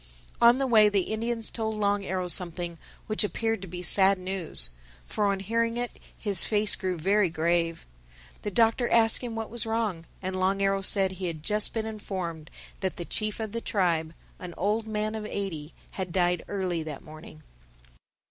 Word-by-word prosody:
On 235 +1 +7
the 270 - 0
way 220 -4 +6
the 200 -2 +1
Indians 230 0 -1
told 220 -1 -2
Long 205 -1 +1
Arrow 185 -1 -2
something 175 -1 0 0.3
which 215 0 +1
appeared 225 0 -1
to 195 - -7
be 180 +1 -7
sad 195 +2 +4
news, 180 - 0 0.3
for 205 - 0
on 200 -1 0
hearing 230 +3 0
it, 245 0 -2 0.3
his 200 -5 -1
face 210 -1 +3
grew 185 -1 -2
very 195 +3 +2
grave. 165 +1 0 0.6
The - - -3
Doctor 230 +4 +2
asked 225 -1 +5
him 240 -3 -5
what 225 -1 -5
was 235 -1 -3
wrong. 215 -7 -2
And 185 0 -4
Long 190 +1 +1
Arrow 195 0 +1
said 195 0 +6
he 185 0 -4
had 160 -3 -5
just 210 +4 +1
been 220 -1 -1
informed 185 -7 -5 0.3
that 190 -2 -2
the 175 - -6
chief 215 +3 -2
of 220 -2 -4
the 230 +1 -4
tribe, 165 -6 0 0.2
an 180 -2 -8
old 215 +4 0
man 215 0 -1
of 215 -1 -4
eighty, 175 -8 -4 0.2
had 185 -2 -4
died 175 -1 +1
early 185 -4 -2
that 155 -3 -7
morning. 155 - -12
195 Hz, 185 wpm, -27 LUFS, 175-220 Hz, 0.6 s, On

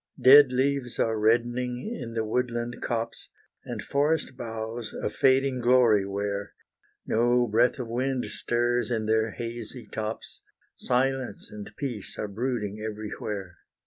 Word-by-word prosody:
Dead 140 0 +8
leaves 130 -1 0
are 110 -1 +1
reddening 120 - +1
in 115 -4 -6
the 110 -1 0
woodland 120 +1 -2
copse, 115 -1 -3 0.3
And - - -5
forest 145 -1 0
boughs 115 -1 -5
a - - -2
fading 130 0 +3
glory 120 -5 +4
wear; 100 0 -3 0.5
No 120 +2 +3
breath 120 +4 +2
of 125 -3 -4
wind 125 +2 -1
stirs 120 +1 0
in 110 -3 -1
their 110 +1 +2
hazy 120 +1 -6
tops, 110 0 -6 0.3
Silence 130 -3 -1
and 105 -1 -8
peace 125 -8 -5
are 105 - -3
brooding 110 -1 -3
everywhere. 105 -3 -5
120 Hz, 130 wpm, -27 LUFS, 110-125 Hz, 0.5 s, Dead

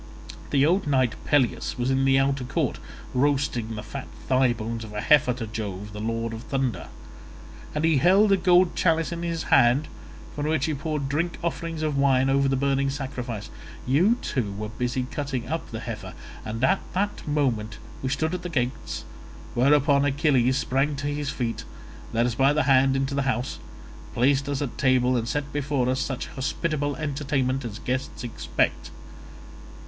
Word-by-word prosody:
The 140 -1 +3
old 180 +2 +2
knight 130 -4 +2
Peleus 135 -4 +1
was 125 +1 0
in 135 0 +2
the 135 0 +4
outer 135 -1 +1
court, 125 - -1 0.3
roasting 130 -4 0
the 105 - -6
fat 130 +5 -7 0.2
thigh 130 -1 +4
bones 115 0 -4
of 105 -1 -9
a 105 - -3
heifer 135 +1 +5
to 120 -1 -5
Jove 105 -2 -5
the 105 - -6
lord 115 +1 -2
of 110 - -6
thunder; 130 - -2 0.9
and 150 +1 +1
he 160 -3 +4
held 195 +8 +5
a - - +7
gold 180 0 +4
chalice 165 -1 +2
in 170 0 -4
his 170 -1 -2
hand 125 +6 +5 0.5
from 145 0 -2
which 155 -2 +1
he 160 - -1
poured 150 -1 -2
drink 160 +5 -1
offerings 165 -1 -3
of 150 -3 0
wine 135 -1 +3
over 140 0 +3
the 135 - +2
burning 140 0 +1
sacrifice. 125 -6 -5 0.3
You 175 - +3
two 115 -7 -1
were 105 +1 -5
busy 125 +2 -2
cutting 130 -2 -4
up 165 +4 -3
the 110 0 -6
heifer, 115 -3 -6 0.3
and 115 +2 -4
at 190 +9 +4
that 200 -1 -2
moment 120 -8 0 0.2
we 130 - -2
stood 160 +5 -1
at 180 - -3
the 175 - -5
gates, 125 -5 -2 0.5
whereon 140 +2 +4
Achilles 135 -3 +2
sprang 135 +2 0
to 140 +1 -3
his 145 -1 -3
feet, 115 -2 -3 0.5
led 115 +1 +2
us 120 - 0
by 135 +4 +3
the 150 - +2
hand 135 0 +4
into 135 +1 -1
the 140 - +1
house, 125 +1 -2 0.6
placed 140 +3 +2
us 140 0 -1
at 135 - -6
table, 130 -1 +3
and 115 -1 -1
set 145 +2 -3
before 140 -3 0
us 130 0 +1
such 135 -1 -2
hospitable 145 +1 -2
entertainment 135 -3 -1
as 110 -3 -5
guests 130 +5 -3
expect. 120 - -1
135 Hz, 180 wpm, -25 LUFS, 125-145 Hz, 0.9 s, a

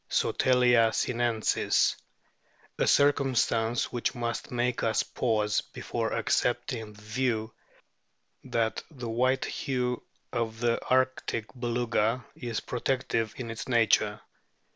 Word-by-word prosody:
Sotalia 125 -3 +3
sinensis], 120 -2 +1 0.8
a - - +2
circumstance 130 -5 +2
which 120 -1 -1
must 120 -1 -3
make 125 0 0
us 110 -1 +2
pause 105 -4 0
before - - -4
accepting 110 -3 0
the 105 - -16
view 110 0 -1 0.9
that 115 -1 -1
the 130 -7 -7
white 130 +3 +2
hue 125 -2 -2 0.3
of 115 -2 -2
the 120 0 +1
arctic 130 -3 +1
Beluga 120 -1 0
is 115 -2 -4
protective 120 -3 -1
in 115 -3 -5
its 115 - -6
nature. 110 -3 +3
120 Hz, 105 wpm, -28 LUFS, 115-125 Hz, 0.9 s, Sotalia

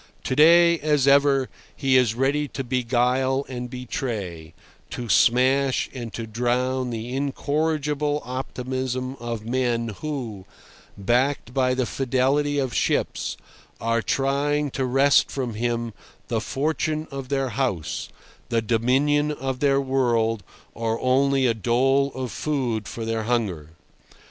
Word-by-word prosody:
To 130 - -1
day, 170 +3 +6
as 150 -2 +2
ever, 140 -1 +4 0.3
he 135 -2 +1
is 125 -4 +4
ready 140 +4 +1
to 135 - -1
beguile 125 +2 +1
and 125 -1 -5
betray, 110 - -5 0.3
to 120 - -5
smash 130 +4 +3
and 120 -3 -6
to 115 - -4
drown 125 +3 -1
the 120 +2 -4
incorrigible 150 +1 -1
optimism 130 0 -3
of 115 -2 -5
men 120 -1 0
who, 125 -11 -5 0.5
backed 120 +4 0
by 130 -1 +2
the 130 -1 0
fidelity 135 +4 +1
of 130 -3 -1
ships, - - -1 0.4
are 115 0 0
trying 140 +3 0
to 130 - -1
wrest 135 +2 +4
from 125 -4 -3
him 115 0 -2 0.4
the 115 -2 0
fortune 155 +4 -1
of 135 -2 -6
their 135 -2 0
house, 120 - -2 0.4
the 115 -2 +2
dominion 135 +7 +2
of 135 -2 -4
their 140 -1 +3
world, 120 -5 +1 0.3
or 115 0 -2
only 135 +1 +2
a 120 - +3
dole 135 +5 +2
of 130 -3 -4
food 125 -8 -2
for 115 - -5
their 115 -1 -2
hunger. 100 -11 -1
130 Hz, 130 wpm, -24 LUFS, 120-140 Hz, 0.5 s, day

